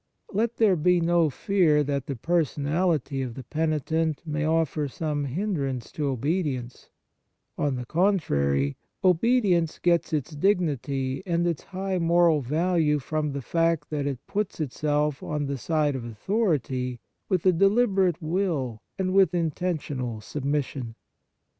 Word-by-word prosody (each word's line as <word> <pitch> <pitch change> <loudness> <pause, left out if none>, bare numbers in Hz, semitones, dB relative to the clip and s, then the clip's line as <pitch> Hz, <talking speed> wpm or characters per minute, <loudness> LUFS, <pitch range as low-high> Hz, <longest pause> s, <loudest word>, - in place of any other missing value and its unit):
Let 225 +3 0
there 210 -5 +4
be 180 +2 +3
no 170 -1 +3
fear 155 -1 +2
that 140 -2 -2
the 140 - -3
personality 150 0 0
of 125 -3 -4
the 130 - -7
penitent 160 +2 -1
may 150 -1 -2
offer 160 -2 +1
some 145 +1 -2
hin 190 +10 -2
drance 135 -7 -3
to 150 -2 -2
obedience; 135 -2 -2 0.7
on 145 -2 0
the 125 -1 -5
contrary, 70 - +1 0.3
obedience 185 -3 +3
gets 170 -1 +1
its 155 +1 -1
dignity 145 - 0
and 170 0 +1
its 170 -4 -2
high 190 0 -2
moral 170 -2 +4
value 155 +2 +1
from 150 +1 -2
the 140 -1 -4
fact 165 -1 0
that 145 -2 -1
it 135 -3 -4
puts 210 -3 -3
itself 150 0 0
on 150 -1 -2
the 140 -1 -3
side 150 0 +1
of 130 - -4
authority 130 - -1 0.3
with 185 -3 0
a 185 - +7
deliberate 195 -2 +3
will 155 - -1 0.2
and 185 -1 -1
with 190 -4 +5
inten 165 -3 +1 0.2
tional 125 -7 -5
submission. 140 -3 -3
155 Hz, 140 wpm, -26 LUFS, 140-175 Hz, 0.7 s, a